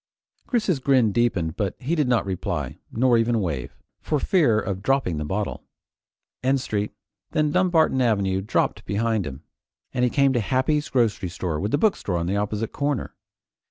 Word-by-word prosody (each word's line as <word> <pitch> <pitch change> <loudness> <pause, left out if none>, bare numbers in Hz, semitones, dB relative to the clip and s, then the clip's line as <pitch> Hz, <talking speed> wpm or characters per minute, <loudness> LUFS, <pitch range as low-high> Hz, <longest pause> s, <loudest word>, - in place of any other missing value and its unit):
Chris's 215 - +1
grin 130 -5 +3
deepened 100 -8 0
but 100 -3 -2
he 140 +6 -2
did 150 -5 +2
not 120 -4 +2
reply, 95 -2 -3
nor 120 0 +3
even 115 0 +2
wave, 75 - -3 0.3
for 150 - 0
fear 135 - +3
of 95 -2 -3
dropping 130 - +1
the 75 - -2
bottle. 95 +7 -3 0.8
N 135 +2 +2
Street, 105 -5 -2 0.4
then 150 -1 +2
Dumbarton 175 -7 +3
Avenue, 100 -5 +1
dropped 100 - 0
behind 105 -2 0
him, 70 +2 -8 0.5
and 125 - 0
he 125 - +4
came 140 0 +3
to 120 - +2
Happy's 130 +7 0
Grocery 115 -7 +1 0.3
with 100 - -1
the 145 - +2
bookshop 150 - +1
on 85 - -1
the 95 +3 -1
opposite 105 +2 -2
corner. 145 -2 -2
115 Hz, 165 wpm, -24 LUFS, 100-135 Hz, 0.8 s, he